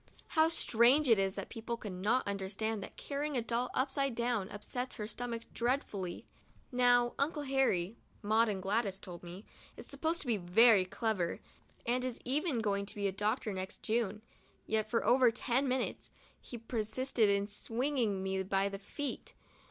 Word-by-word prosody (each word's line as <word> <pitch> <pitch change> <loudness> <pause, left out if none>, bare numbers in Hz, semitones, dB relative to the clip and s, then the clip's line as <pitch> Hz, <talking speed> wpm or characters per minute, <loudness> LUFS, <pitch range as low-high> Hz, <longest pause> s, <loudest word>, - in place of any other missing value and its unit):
How 320 -1 +4
strange 265 -1 +4
it 225 -4 +5
is 195 0 +1
that - - -5
people 235 +1 -4
cannot 210 +4 -1
understand 200 +2 -2
that - - -9
carrying 290 0 -2
a - - +2
doll 235 +2 -1
upside 270 -1 +1
down 235 -5 0
upsets 245 +5 -5
her 210 - -4
stomach 235 +1 -4
dreadfully. 225 -8 -2 0.5
Now 245 -1 +4
Uncle 295 +1 0
Harry, 245 -8 +1 0.3
Maud 220 +2 +3
and 190 -3 -3
Gladys 200 -1 0
told 175 -3 -9
me, 180 +4 -9 0.3
is - - -8
supposed 325 +1 -2
to - - -8
be 235 -4 +1
very 195 +2 +5
clever, 185 -3 -1 0.5
and 250 +2 +1
is 255 -2 -3
even 275 -1 +1
going 200 -2 0
to - - -7
be 200 -1 0
a - - 0
doctor 210 +2 -1
next 190 0 -6
June; 215 -2 -1 0.4
yet, 215 0 0
for 230 - 0
over 250 0 +6
ten 245 +3 0
minutes, 255 0 -2 0.3
he 240 - -8
persisted 225 0 0
in 200 0 +2
swinging 225 -1 -1
me 190 0 -1
by 195 +1 +1
the 195 0 -6
feet. 280 +8 -5
225 Hz, 165 wpm, -33 LUFS, 200-250 Hz, 0.5 s, over